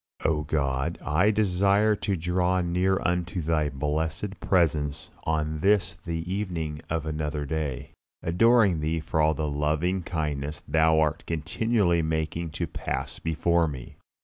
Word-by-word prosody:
O 75 -1 +2
God, 70 +1 -1
I 85 +8 +3
desire 100 +1 +3
to 100 -1 -1
draw 90 +2 +1
near 90 +2 +1
unto 90 +1 0
Thy 80 -2 +1
blessed 80 +7 -2
presence 80 -4 +1
on 80 -1 -1
this 95 +1 +2
the 85 -1 -5
evening 80 -7 -3
of 80 -1 -1
another 75 -1 -2
day, 75 -4 -3 0.3
adoring 100 0 +4
Thee 80 +2 -1
for 80 0 -1
all 80 0 +3
the 75 0 -2
loving 75 +6 0
kindness 75 -3 -3
Thou 80 +1 +4
art 75 -2 +1
continually 85 +3 +1
making 80 +1 -2
to 85 +3 -3
pass - - -4
before 85 +1 +1
me. 65 -5 -8
80 Hz, 140 wpm, -26 LUFS, 75-90 Hz, 0.3 s, adoring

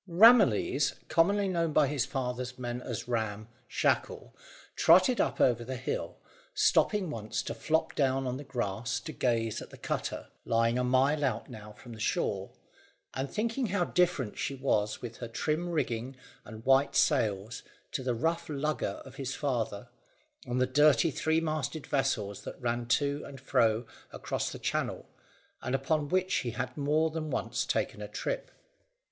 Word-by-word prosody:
Ramillies 170 - +5
commonly 200 +4 +3
known 170 -4 0
by 150 - +5
his 135 -3 -1
father's 125 -1 -3
men 120 -1 -4
as 120 -1 -5
Ram 110 -3 -2 0.2
Shackle - - -1 0.4
trotted 185 +9 +5
up - - -1
over 120 -2 +3
the 130 +2 -5
hill, 130 - -4 0.4
stopping 220 - +3
once 110 -5 -3
to - - -4
flop 160 +1 0
down 135 -1 +1
on 125 0 -2
the 145 - -7
grass 115 -4 -2
to 155 - -6
gaze 115 -6 0
at - - -9
the - - -12
cutter, - - -3
lying 115 +1 +2
a - - +1
mile 135 +4 +3
out 125 -2 -1
now 105 -2 -10
from 120 +2 -12
the 110 - -11
shore, - - -1 0.6
and 135 +1 -3
thinking 230 +3 -1
how 200 -2 +1
different 170 -13 +1
she 140 - -2
was 105 -6 0
with 115 -1 -6
her 120 - -5
trim 155 +9 -1
rigging 130 -5 -2 0.3
and 110 0 -10
white 135 +1 +4
sails 110 -6 +1 0.3
to - - -2
the 125 -2 -1
rough 165 +7 -1
lugger 150 +1 -2
of - - -12
his 135 -1 -3
father, 120 -5 -2 0.6
and 125 +1 -1
the 130 - +4
dirty 145 +3 +4
three 160 +4 +1
masted 155 -2 -2
vessels 115 -8 -1
that - - -8
ran 120 -1 -2
to 140 +3 +1
and 135 - -9
fro 120 -3 +2 0.3
across - - -3
the - - -6
Channel, - - -2 0.5
and 130 - -1
upon 145 +2 0
which 185 0 +1
he 120 - -1
had 125 +2 -4
more 155 +2 +1
than 155 -1 -4
once - - -2
taken - - -1
a - - -5
trip. - - -3
135 Hz, 165 wpm, -30 LUFS, 120-155 Hz, 0.6 s, Ramillies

